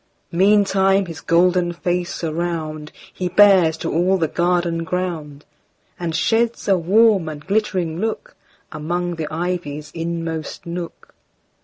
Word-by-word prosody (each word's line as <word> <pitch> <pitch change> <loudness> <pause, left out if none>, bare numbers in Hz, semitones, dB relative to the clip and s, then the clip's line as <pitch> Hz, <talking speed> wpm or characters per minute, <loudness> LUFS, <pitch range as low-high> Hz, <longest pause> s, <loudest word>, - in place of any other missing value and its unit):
Meantime 195 +1 +3
his 165 -2 -8
golden 175 +1 +2
face 175 0 -3
aroundHe 165 +1 -4
bears 190 -6 +6
to 165 0 -3
all 180 +4 +2
the 165 -3 0
garden 170 0 0
ground, 165 -5 -4 0.5
And 170 -2 -3
sheds 225 +7 +1
a 195 - +5
warm 195 0 +3
and 150 -1 -9
glittering 190 -5 -1
lookAmong 175 -5 -5
the 155 -2 -3
ivy's 155 -3 -4
inmost 165 -1 -4
nook. 170 0 -7
175 Hz, 115 wpm, -20 LUFS, 160-185 Hz, 0.5 s, bears